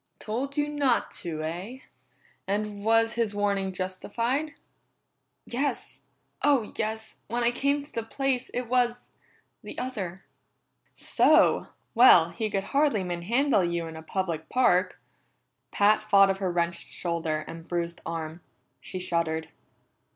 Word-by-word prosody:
"Told 265 Hz, +6 st, -4 dB
you 295 Hz, 0 st, +2 dB
not 285 Hz, -5 st, +1 dB
to, 155 Hz, -3 st, -4 dB
eh? 185 Hz, -, -5 dB, 0.7 s
And 205 Hz, 0 st, -2 dB
was 225 Hz, +1 st, +3 dB
his 230 Hz, -3 st, -1 dB
warning 200 Hz, -2 st, 0 dB
justified?" 230 Hz, -, -2 dB, 0.9 s
"Yes. 275 Hz, +4 st, -2 dB, 0.4 s
Oh, 275 Hz, -7 st, +2 dB
yes! 220 Hz, 0 st, -3 dB
When 235 Hz, +2 st, -1 dB
I 235 Hz, -, +4 dB
came 280 Hz, +3 st, 0 dB
to 290 Hz, -, -17 dB
the 230 Hz, -, -1 dB
place, 260 Hz, +2 st, -1 dB
it 250 Hz, -, -2 dB
was 245 Hz, 0 st, 0 dB, 0.5 s
the -, -, -9 dB
other." 195 Hz, -8 st, -4 dB, 0.7 s
"So! -, -, +4 dB, 0.3 s
Well, 180 Hz, -9 st, +7 dB
he 220 Hz, -2 st, -2 dB
could 195 Hz, -2 st, -1 dB
hardly 280 Hz, -8 st, +3 dB
manhandle 195 Hz, +7 st, +1 dB
you 170 Hz, -1 st, -1 dB
in 160 Hz, 0 st, -8 dB
a 160 Hz, -, -8 dB
public 165 Hz, -2 st, -3 dB
park." 185 Hz, -8 st, +2 dB, 0.7 s
Pat 210 Hz, +1 st, +3 dB
thought 195 Hz, -2 st, +5 dB
of 195 Hz, -, -3 dB
her 190 Hz, -2 st, -1 dB
wrenched 170 Hz, 0 st, -1 dB
shoulder 165 Hz, -3 st, -2 dB
and 165 Hz, 0 st, -9 dB
bruised 170 Hz, -1 st, -3 dB
arm. 165 Hz, 0 st, -5 dB, 0.4 s
She 185 Hz, -, -7 dB
shuddered. 165 Hz, -3 st, -1 dB
205 Hz, 135 wpm, -27 LUFS, 175-245 Hz, 0.9 s, Well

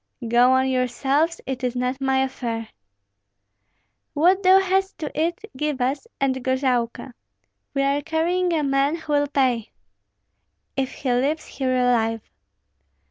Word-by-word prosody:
"Go 240 Hz, +2 st, +5 dB
on 260 Hz, 0 st, +3 dB
yourselves; 265 Hz, +6 st, 0 dB
it 265 Hz, 0 st, -4 dB
is 250 Hz, 0 st, -1 dB
not 250 Hz, +2 st, -2 dB
my 265 Hz, 0 st, +2 dB
affair." 230 Hz, -4 st, -4 dB, 1.5 s
"What 360 Hz, +6 st, +4 dB
thou 375 Hz, 0 st, +6 dB
hast 385 Hz, +1 st, 0 dB
to 305 Hz, -3 st, -5 dB
eat, 335 Hz, +3 st, -1 dB, 0.2 s
give 295 Hz, 0 st, -2 dB
us, 270 Hz, -, -1 dB
and 260 Hz, -2 st, 0 dB
gorailka. 255 Hz, -2 st, -1 dB, 0.6 s
We 275 Hz, -, +2 dB
are 280 Hz, +1 st, +1 dB
carrying 345 Hz, +4 st, 0 dB
a 320 Hz, -3 st, +1 dB
man 275 Hz, +2 st, +1 dB
who 315 Hz, -2 st, -5 dB
will 290 Hz, 0 st, +2 dB
pay." 255 Hz, -6 st, 0 dB, 1.1 s
"If 270 Hz, -1 st, -1 dB
he 255 Hz, -3 st, -2 dB
leaves 280 Hz, +6 st, 0 dB
here 260 Hz, -2 st, -2 dB
alive." 225 Hz, -3 st, +1 dB
270 Hz, 135 wpm, -23 LUFS, 250-305 Hz, 1.5 s, thou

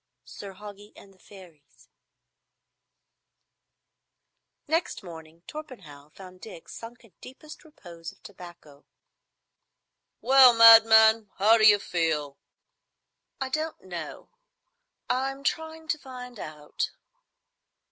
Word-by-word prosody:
Sir 195 Hz, -1 st, -11 dB
Hoggie 205 Hz, +1 st, -13 dB
and 195 Hz, -, -17 dB
the 190 Hz, -, -29 dB
Fairies 175 Hz, -8 st, -19 dB, 2.8 s
Next 325 Hz, -, -2 dB
morning 165 Hz, -1 st, -13 dB
Torpenhow 190 Hz, -, -12 dB
found 185 Hz, +2 st, -15 dB
Dick 170 Hz, -7 st, -13 dB
sunk 235 Hz, +2 st, -11 dB
in 215 Hz, -, -24 dB
deepest 300 Hz, +4 st, -14 dB
repose 170 Hz, -, -12 dB
of -, -, -27 dB
tobacco. 175 Hz, -7 st, -15 dB, 1.4 s
"Well, 260 Hz, -2 st, +6 dB
madman, 225 Hz, -1 st, +6 dB
how 220 Hz, +4 st, +3 dB
d'you 215 Hz, -1 st, +6 dB
feel?" 160 Hz, -7 st, -3 dB, 1.0 s
"I 265 Hz, -1 st, -4 dB
don't 310 Hz, +3 st, -4 dB
know. 175 Hz, -4 st, -9 dB, 0.8 s
I'm 270 Hz, +2 st, -3 dB
trying 320 Hz, +1 st, -4 dB
to 300 Hz, +1 st, -1 dB
find 250 Hz, -4 st, -11 dB
out." 150 Hz, -1 st, -6 dB
210 Hz, 95 wpm, -25 LUFS, 170-255 Hz, 2.8 s, Well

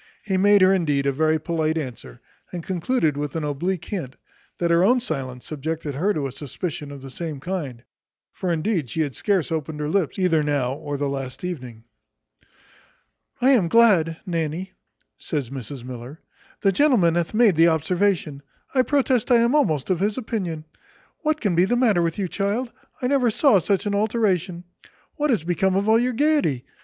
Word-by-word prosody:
He 195 Hz, -3 st, -1 dB
made 200 Hz, +1 st, +5 dB
her 190 Hz, +1 st, +6 dB
indeed 150 Hz, -7 st, +1 dB
a 140 Hz, -, +2 dB
very 155 Hz, +3 st, +2 dB
polite 160 Hz, 0 st, -1 dB
answer, 120 Hz, -, -7 dB, 0.3 s
and 175 Hz, -2 st, -5 dB
concluded 175 Hz, -, 0 dB
with 145 Hz, 0 st, -4 dB
an 160 Hz, -, -2 dB
oblique 155 Hz, +5 st, -2 dB
hint, 160 Hz, -11 st, -5 dB, 0.4 s
that 170 Hz, -1 st, 0 dB
her 170 Hz, +1 st, +4 dB
own 245 Hz, +6 st, +4 dB
silence 130 Hz, -, -5 dB
subjected 155 Hz, 0 st, -4 dB
her 180 Hz, +10 st, +1 dB
to 150 Hz, -8 st, -2 dB
a 135 Hz, -, -3 dB
suspicion 145 Hz, +2 st, -6 dB
of 140 Hz, -2 st, -10 dB
the 135 Hz, -, -9 dB
same 155 Hz, 0 st, -5 dB
kind: 145 Hz, -8 st, -5 dB, 0.5 s
for 185 Hz, -, -3 dB
indeed 165 Hz, -, -1 dB
she 160 Hz, -, -2 dB
had 140 Hz, -5 st, -2 dB
scarce 190 Hz, -, 0 dB
opened 155 Hz, -1 st, -3 dB
her 150 Hz, -, -2 dB
lips 170 Hz, -1 st, 0 dB
either 180 Hz, -5 st, +2 dB
now 140 Hz, -4 st, 0 dB
or 145 Hz, 0 st, -5 dB
the 145 Hz, 0 st, -1 dB
last 135 Hz, 0 st, -5 dB
evening. 125 Hz, -11 st, -6 dB, 1.6 s
"I 260 Hz, +2 st, +5 dB
am 220 Hz, -10 st, +4 dB
glad, 175 Hz, -7 st, +4 dB
Nanny," 170 Hz, +1 st, -3 dB, 0.5 s
says 140 Hz, -6 st, -3 dB
Mrs 130 Hz, -1 st, -7 dB
Miller, 125 Hz, +4 st, -8 dB, 0.4 s
"the 195 Hz, -, +3 dB
gentleman 195 Hz, -, +3 dB
hath 170 Hz, +3 st, -1 dB
made 220 Hz, -5 st, +5 dB
the 165 Hz, +2 st, +5 dB
observation; 165 Hz, -2 st, 0 dB, 0.3 s
I 260 Hz, -, +4 dB
protest 260 Hz, -3 st, +1 dB
I 245 Hz, -, +6 dB
am 235 Hz, +3 st, +2 dB
almost 185 Hz, -, +1 dB
of 180 Hz, -, +1 dB
his 205 Hz, +2 st, 0 dB
opinion. 190 Hz, -10 st, -4 dB, 0.5 s
What 310 Hz, -1 st, 0 dB
can 205 Hz, -5 st, 0 dB
be 175 Hz, +2 st, +4 dB
the 245 Hz, +5 st, +1 dB
matter 220 Hz, -8 st, +3 dB
with 165 Hz, -1 st, -1 dB
you, 195 Hz, -2 st, -1 dB
child? 210 Hz, +7 st, -2 dB, 0.3 s
I -, -, +1 dB
never 255 Hz, -2 st, +2 dB
saw 225 Hz, -1 st, +4 dB
such 195 Hz, +4 st, 0 dB
an 205 Hz, -, -1 dB
alteration. 200 Hz, -5 st, 0 dB, 0.5 s
What 300 Hz, 0 st, 0 dB
is 225 Hz, -, +1 dB
become 185 Hz, +2 st, +1 dB
of 200 Hz, +2 st, 0 dB
all 220 Hz, +1 st, +5 dB
your 250 Hz, +1 st, 0 dB
gaiety? 280 Hz, -, +1 dB
170 Hz, 185 wpm, -23 LUFS, 150-205 Hz, 1.6 s, her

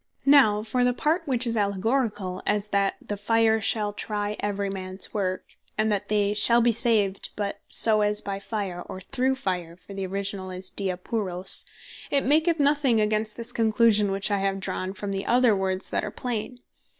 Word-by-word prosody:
Now 255 Hz, -7 st, +5 dB
for 245 Hz, +3 st, -1 dB
the 245 Hz, 0 st, +1 dB
part 325 Hz, +5 st, 0 dB
which 255 Hz, -2 st, +1 dB
is 230 Hz, -1 st, -1 dB
Allegoricall, 205 Hz, -2 st, -1 dB
as 210 Hz, 0 st, 0 dB
"That 200 Hz, -1 st, +1 dB
the 205 Hz, -, -3 dB
fire 220 Hz, +1 st, +2 dB
shall 210 Hz, -1 st, 0 dB
try 210 Hz, 0 st, -3 dB
every 205 Hz, -1 st, -2 dB
mans 190 Hz, -1 st, -5 dB
work," 185 Hz, -3 st, -4 dB, 0.2 s
and 215 Hz, 0 st, +1 dB
that 205 Hz, 0 st, -1 dB
"They 205 Hz, -1 st, +1 dB
shall 230 Hz, +3 st, +6 dB
be 240 Hz, 0 st, +3 dB
saved, 220 Hz, -4 st, +1 dB
but 205 Hz, -1 st, -4 dB
so 215 Hz, -2 st, +5 dB
as 210 Hz, 0 st, +2 dB
by 200 Hz, -1 st, -5 dB
fire," 200 Hz, -4 st, -4 dB
or 185 Hz, -, -8 dB
"through 260 Hz, +7 st, -1 dB
fire," 180 Hz, -9 st, -4 dB
(for 185 Hz, +2 st, -13 dB
the 195 Hz, -1 st, -4 dB
originall 195 Hz, 0 st, -4 dB
is 185 Hz, 0 st, -6 dB
dia 190 Hz, -3 st, -1 dB
puros,) 185 Hz, -2 st, +1 dB, 0.4 s
it 280 Hz, -1 st, +1 dB
maketh 315 Hz, +4 st, +2 dB
nothing 280 Hz, -5 st, +2 dB
against 215 Hz, 0 st, 0 dB
this 235 Hz, +1 st, -3 dB
conclusion 220 Hz, -2 st, +3 dB
which 195 Hz, +1 st, -1 dB
I 200 Hz, -, +1 dB
have 195 Hz, 0 st, -1 dB
drawn 185 Hz, 0 st, -4 dB
from 200 Hz, 0 st, -6 dB
the 195 Hz, 0 st, -4 dB
other 245 Hz, -3 st, +4 dB
words, 190 Hz, 0 st, -3 dB
that -, -, -1 dB
are -, -, -3 dB
plain. 245 Hz, 0 st, -4 dB
210 Hz, 185 wpm, -25 LUFS, 195-230 Hz, 0.4 s, shall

